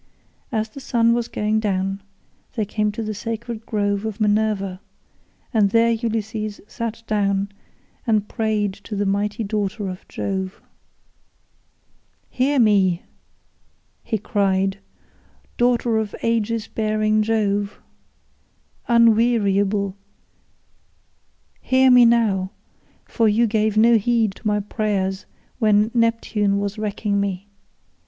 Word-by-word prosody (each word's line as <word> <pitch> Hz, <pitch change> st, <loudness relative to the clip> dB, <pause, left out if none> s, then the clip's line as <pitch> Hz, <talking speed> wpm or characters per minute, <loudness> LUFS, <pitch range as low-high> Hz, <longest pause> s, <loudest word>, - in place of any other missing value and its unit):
As 220 Hz, -2 st, -1 dB
the 245 Hz, -, -10 dB
sun 235 Hz, -3 st, +2 dB
was 235 Hz, 0 st, -1 dB
going 215 Hz, +1 st, 0 dB
down 195 Hz, -2 st, -1 dB, 0.5 s
they 220 Hz, -3 st, 0 dB
came 210 Hz, +1 st, -1 dB
to 225 Hz, -, -4 dB
the 215 Hz, 0 st, -3 dB
sacred 230 Hz, +1 st, -5 dB
grove 205 Hz, -1 st, 0 dB
of 220 Hz, -1 st, -4 dB
Minerva, 205 Hz, -3 st, 0 dB, 0.7 s
and 210 Hz, -3 st, +4 dB
there 230 Hz, +2 st, +3 dB
Ulysses 220 Hz, -2 st, -3 dB
sat 230 Hz, 0 st, -5 dB
down 200 Hz, -2 st, 0 dB, 0.6 s
and 215 Hz, -2 st, +2 dB
prayed 215 Hz, -3 st, -1 dB
to 210 Hz, -, -5 dB
the 205 Hz, 0 st, 0 dB
mighty 205 Hz, +3 st, -1 dB
daughter 205 Hz, -1 st, -2 dB
of 185 Hz, 0 st, -9 dB
Jove. 190 Hz, -1 st, -4 dB, 1.7 s
"Hear 275 Hz, +3 st, +1 dB
me," 195 Hz, -7 st, +3 dB, 1.0 s
he 220 Hz, -, -1 dB
cried, 195 Hz, -1 st, 0 dB, 0.8 s
"daughter 240 Hz, -2 st, +2 dB
of 215 Hz, -2 st, -4 dB
Aegis 230 Hz, -1 st, 0 dB
bearing 215 Hz, 0 st, +1 dB
Jove, 205 Hz, -2 st, 0 dB, 1.1 s
unweariable, 215 Hz, -4 st, +3 dB, 1.7 s
hear 260 Hz, 0 st, +4 dB
me 245 Hz, -1 st, +8 dB
now, 215 Hz, -5 st, +2 dB, 0.6 s
for 225 Hz, -2 st, +1 dB
you 225 Hz, +3 st, +3 dB
gave 215 Hz, -1 st, 0 dB
no 230 Hz, +1 st, +6 dB
heed 225 Hz, -1 st, +1 dB
to 215 Hz, -, -6 dB
my 210 Hz, 0 st, +1 dB
prayers 200 Hz, -2 st, -2 dB, 0.3 s
when 215 Hz, -1 st, +3 dB
Neptune 230 Hz, -3 st, +1 dB
was 200 Hz, +1 st, -3 dB
wrecking 205 Hz, -1 st, -1 dB
me. 200 Hz, 0 st, -3 dB
215 Hz, 115 wpm, -22 LUFS, 200-230 Hz, 1.7 s, me